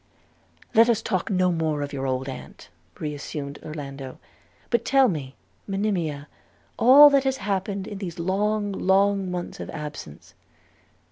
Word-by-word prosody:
'Let 230 +2 +6
us 230 -2 +3
talk 185 -5 -1
no 185 -1 +2
more 160 -3 -1
of 145 - -6
your 135 -1 -3
old 130 0 -2
aunt,' 130 - -9 0.3
re 150 -1 -4
assumed 145 0 -6
Orlando; 140 -4 -7 0.5
'but 235 -1 +2
tell 270 +1 +4
me, 145 - -4 0.3
Monimia, 180 -8 -2 0.5
all 285 +4 +9
that 275 -1 +4
has 265 -1 0
happened 195 -2 -2
in 205 -2 -7
these 175 -5 -6
long, 205 +4 0
long 195 0 +2
months 180 -1 -5
of - - -6
absence.' 150 - -8
185 Hz, 145 wpm, -24 LUFS, 150-210 Hz, 0.5 s, all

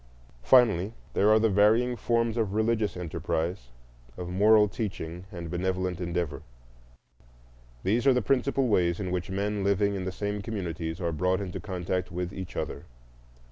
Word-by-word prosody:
Finally, 105 - +4 0.2
there 105 - +3
are 110 - +6
the 110 +1 +3
varying 110 +5 +3
forms 115 -1 0
of 110 -4 -1
religious 110 -2 +1
enterprise, 85 -3 -3 0.5
of 90 -1 -5
moral 105 +3 +5
teaching 95 -4 -5
and 85 -2 -7
benevolent 90 0 -2
endeavor. 85 -4 -2 1.4
These 115 +7 +1
are 135 - +7
the 125 - +1
principal 135 +3 +1
ways 90 -5 +2
in 95 -3 -3
which 90 -1 -2
men 100 +1 -1
living 100 +1 +2
in 95 -2 -3
the 95 - -2
same 105 +2 -3
communities 90 -6 -4
are 85 -2 -1
brought 90 +4 +1
into 95 -3 -5
contact 90 -2 -3
with 90 +1 -4
each 95 -2 -7
other. - - -4
95 Hz, 155 wpm, -28 LUFS, 90-110 Hz, 1.4 s, are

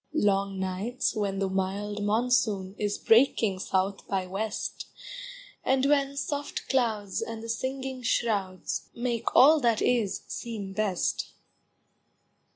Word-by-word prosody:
Long 195 -5 +1
nights 190 +7 -1
when 200 -2 -1
the 195 0 0
mild 195 +2 -2
monsoon 215 -3 +1
Is 205 -1 0
breaking 225 -4 +4
south 190 +1 -1
by 190 -1 -1
west, 205 +4 -4 0.8
And 265 0 +2
when 280 -1 +2
soft 285 0 -3
clouds 220 -7 0
and 225 0 -5
the 230 - -7
singing 260 +2 -3
shrouds 205 -6 -1
Make 235 -1 -2
all 305 +4 +8
that 235 -4 +2
is 230 -6 +1
seem 210 -5 -5
best. 195 -3 -1
215 Hz, 120 wpm, -28 LUFS, 195-250 Hz, 0.8 s, all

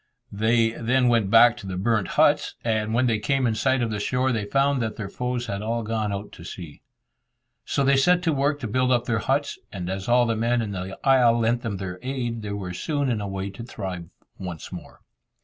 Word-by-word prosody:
They 115 +2 +2
then 125 +2 +1
went 115 -5 +2
back 115 +2 +7
to 100 - -9
the 90 -1 -4
burnt 105 0 +1
huts, - - +3
and 110 -2 0
when 125 +2 +3
they 115 -3 +1
came 135 +5 +1
in 115 - +2
sight 130 +3 +1
of 115 - -1
the 105 - -2
shore, 125 +5 0
they 110 -4 -1
found 135 +3 +1
that 110 -2 -2
their 100 -3 -5
foes 125 +2 -3
had 100 -3 -4
all 115 +2 -2
gone 110 -1 -2
out 100 +1 -5
to 85 - -12
sea. 85 -4 -9 0.8
So 140 - 0
they 140 0 +4
set 180 +6 +3
to 165 -2 +2
work 145 +1 +1
to 120 - -3
build 130 +4 +1
up 120 -1 +2
their 115 -2 0
huts, 140 +5 -1
and 90 -2 -4
as 95 0 -4
all 120 0 +5
the 115 -1 0
men 120 +2 +1
in 105 - -4
the 95 0 -5
isle 125 -3 +5
lent 120 +1 +1
them 110 -5 -3
their 90 -1 -6
aid, 125 -3 -3
they 105 - -6
were 95 -3 -5
soon 145 - -1
in 110 -3 -1
a 100 - -3
way 95 0 -4
to 100 - -10
thrive 90 -7 -6 0.3
once 90 -4 -7
more. - - -10
115 Hz, 235 wpm, -24 LUFS, 100-125 Hz, 0.8 s, back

